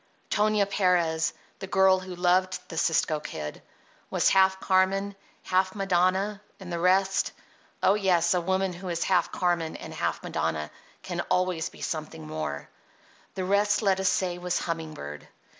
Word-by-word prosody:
Tonia 210 -1 +3
Perez, 175 -5 +1 0.3
the 190 - -6
girl 190 -1 +4
who 185 -1 -8
loved 180 +1 +2
the 165 - -7
Cisco 160 -2 +1
Kid, 75 - -6 0.5
was - - +3
half 190 0 +4
Carmen, 195 +1 +1 0.3
half 185 +1 +1
Madonna, 195 +1 +1 0.2
and 180 -3 -7
the 170 - -2
rest—oh, 190 +1 0
yes, 185 -4 +2
a 180 - +1
woman 190 +1 0
who 180 +2 -8
is 170 -1 -1
half 180 -3 +2
Carmen 170 -3 0
and - - -8
half - - -2
Madonna 75 -1 -2 0.3
can - - -3
always 180 -3 +1
be - - -15
something 155 - -4
more—the 75 - -7
rest, 205 +3 +2
let 190 -2 +3
us 190 - +2
say, 180 -2 -1
was 180 0 -1
humming 165 -2 -4
bird. 75 +1 -8
185 Hz, 150 wpm, -27 LUFS, 165-190 Hz, 0.5 s, girl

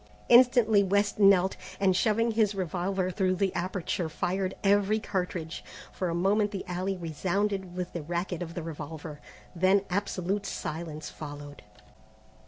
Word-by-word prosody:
Instantly 240 -4 +6
West 200 +2 +1
knelt, 195 -2 +5 0.2
and 190 -2 +3
shoving 230 +4 +2
his 215 -2 +2
revolver 185 +1 -1
through 185 -1 +1
the 190 0 0
aperture 180 -2 -2
fired 185 +4 -2
every 205 +1 +3
cartridge. 180 -5 -3 0.3
For 185 - -2
a 170 - -1
moment 205 +4 +2
the 200 -2 -5
alley 185 +2 -2
resounded 185 +3 -2
with 180 -1 -4
the 170 - -3
racket 175 +3 -3
of 170 -1 -6
the 170 - -4
revolver, 155 -1 -7 0.3
then 190 +3 +3
absolute 195 0 -1
silence 155 -1 -5
followed. 145 -1 -9
185 Hz, 140 wpm, -28 LUFS, 170-200 Hz, 0.3 s, Instantly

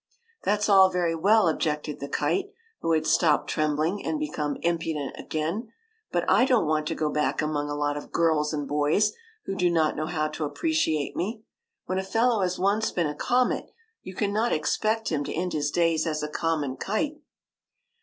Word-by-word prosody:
"That 210 +1 +1
's - - +2
all 190 -2 +7
very 175 -2 0
well," 200 +4 +4
objected 150 -2 -1
the 140 - -5
kite, 395 +1 0 0.3
who 165 - 0
had 155 -1 +1
stopped 155 -2 +2
trembling 155 +5 0
and 310 - -1
become 150 - -2
impudent 165 -4 -1
again; 170 +9 -3 0.2
'* 445 0 -45
but - - 0
I - - +5
don't 255 -6 +3
want 155 0 0
to 165 - -2
go 155 -1 -1
back 150 0 0
among 150 -1 -1
a 145 - -2
lot 145 0 -1
of 145 - -8
girls 160 -3 +2
and 145 -2 -3
boys 150 +8 +2 0.3
who - - -3
do 180 -2 +2
not 160 -2 +2
know 155 +1 -2
how 155 -3 -1
to 155 - -5
appreciate 160 - 0
me. 215 +4 -3 0.4
When 185 0 -1
a - - -2
fellow 225 +2 +2
has 185 -1 0
once 205 +4 +1
been 175 - 0
a 150 - -2
comet, 250 +10 0 0.3
you 185 - -9
cannot 215 +4 0
expect 215 +8 0
him 150 -3 -1
to - - -4
end 180 +2 -2
his 150 -1 0
days 165 0 +1
as 155 -1 -2
a - - -1
common 150 -4 -1
kite." 295 +9 -2
165 Hz, 195 wpm, -26 LUFS, 150-205 Hz, 0.4 s, all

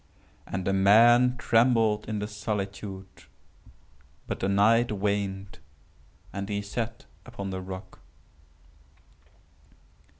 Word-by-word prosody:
And 95 -1 -4
the 95 - +1
man 120 +6 +5
trembled 115 -3 +2
in 110 - -2
the 105 0 -3
solitude;—but 100 -2 -5 1.2
the 95 - -1
night 110 +4 +3
waned, 100 -2 -3 0.7
and 100 +1 -5
he 100 0 -2
sat 115 +3 -5 0.2
upon 100 -6 -7
the 95 0 -4
rock. 95 0 -9
105 Hz, 95 wpm, -27 LUFS, 95-115 Hz, 1.2 s, man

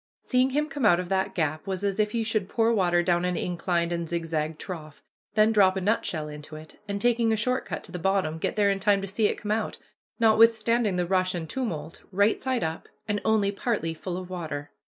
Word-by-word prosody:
Seeing 255 0 +2
him 295 +3 0
come 280 -2 -5
out 180 -5 +5
of 180 -1 -4
that 190 0 0
gap 155 0 -1
was 190 0 -3
as 200 0 -1
if 210 +1 +1
you 230 - +1
should 215 -3 -1
pour 230 0 +2
water 175 -4 +2
down 175 0 +2
an 180 -1 0
inclined 175 -1 -1
and 170 -1 -3
zigzag 160 -2 -2
trough, 155 -5 -8 0.3
then 215 +1 +5
drop 195 -3 +4
a - - -1
nutshell 180 -6 0
into 150 +1 -9
it, 155 0 -12
and, 200 0 -2
taking 235 0 +2
a - - +3
short 250 +4 -1
cut - - -4
to - - -12
the 180 - -5
bottom, 175 -3 0
get - - -2
there 205 -1 +3
in 195 - -1
time 200 0 +3
to 195 - -4
see 205 +3 +1
it - - -2
come 210 - -4
out, 220 0 -1 0.4
notwithstanding 225 -1 +4
the 180 -1 0
rush 185 0 +1
and 160 -2 -4
tumult, 170 - -4
right 200 +3 +2
side 260 -2 -1
up, 160 0 -4 0.2
and 205 -1 -1
only 215 -2 +2
partly 200 -6 -2
full 175 +2 -5
of 185 -1 -6
water. 155 -5 -5
195 Hz, 230 wpm, -26 LUFS, 170-220 Hz, 0.4 s, out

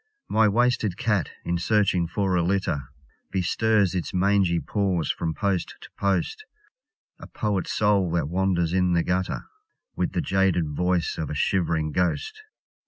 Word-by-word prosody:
My 110 0 +4
wasted 110 -3 +1
cat, 105 -6 0 0.2
in 85 0 -1
searching 95 -3 +2
for 95 +1 0
a 90 - +3
litter, 90 -6 0 0.4
Bestirs 100 +1 +1
its 90 0 -3
mangy 95 -2 +2
paws 95 -7 0
from 80 -2 -3
post 100 -4 -1
to - - -13
post; 100 - -1 0.8
(A - - -10
poet's 105 -4 -2
soul 105 -4 +2
that 85 -4 0
wanders 90 -1 0
in 90 -1 +2
the 85 -1 +2
gutter, 90 +1 -1 0.5
With - - -1
the - - 0
jaded 95 -4 +1
voice 90 +2 0
of 80 - -3
a - - -4
shiv'ring 80 -1 0
ghost). 430 - -1
95 Hz, 150 wpm, -25 LUFS, 85-100 Hz, 0.8 s, My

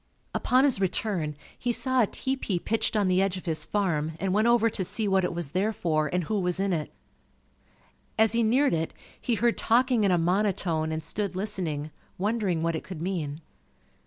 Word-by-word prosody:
Upon 255 +2 +3
his 265 -8 +2
return, 180 -5 -1 0.2
he 245 - -1
saw 260 +1 +1
a 220 - +3
tepee 260 -7 -2
pitched 220 +5 -1
on 205 -2 +2
the 185 0 +3
edge 195 -1 0
of 185 - -9
his 160 -3 -1
farm 160 -5 -1
and 190 -1 0
went 215 +3 +3
over 235 -1 +4
to 205 -3 -1
see 210 +4 -1
what 190 -1 +3
it - - 0
was 170 -4 -3
there 195 +6 +1
for 155 -7 0
and 180 0 0
who 210 +5 -1
was 180 0 0
in 195 -1 +1
it. 155 -3 -2 1.3
As 220 -1 +5
he 235 - +2
neared 255 +6 +3
it, 165 0 -1 0.3
he 240 - 0
heard 235 +2 +1
talking 245 0 +3
in 200 - +3
a 180 - +4
monotone 170 -3 0
and 160 0 -3
stood 200 -3 -3
listening, 175 -7 -3 0.3
wondering 200 -4 0
what 165 0 0
it 160 - -4
could 185 -4 -8
mean. 165 -4 -3
190 Hz, 200 wpm, -27 LUFS, 165-220 Hz, 1.3 s, As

